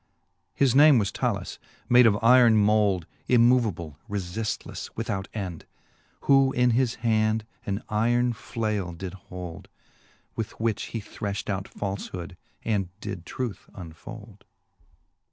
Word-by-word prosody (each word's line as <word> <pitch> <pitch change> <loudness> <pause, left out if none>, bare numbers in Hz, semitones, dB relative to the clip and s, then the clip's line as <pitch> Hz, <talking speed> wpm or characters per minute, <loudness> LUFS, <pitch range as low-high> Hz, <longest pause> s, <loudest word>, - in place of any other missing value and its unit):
His 135 -4 +3
name 145 0 +7
was 100 -4 +1
Talus, - - -2 0.3
made 125 -1 +7
of 105 - +4
yron 115 +1 +6
mould. 105 -4 +3 0.2
Immoveable, 115 -11 +3
reiiftlefle, 105 +2 -4
without 95 -1 -3
end. 95 -6 -6 0.5
Who 135 -1 +4
in 125 0 +3
his 120 0 +1
hand 110 -1 +2 0.2
an 100 +1 -2
yron 120 +3 +2
flale 105 -7 -3
did 95 +1 -6 0.2
hould. 90 -2 -8 0.7
With 110 -1 -5
which 110 -2 0
he 115 - -5
threfht 100 0 -4
out 95 0 -2
faldiood, 95 -3 -5 0.3
and 100 -5 0
did 90 -5 -6
truth 125 -6 -5
unfould. 100 +4 -10
110 Hz, 120 wpm, -26 LUFS, 95-115 Hz, 0.7 s, name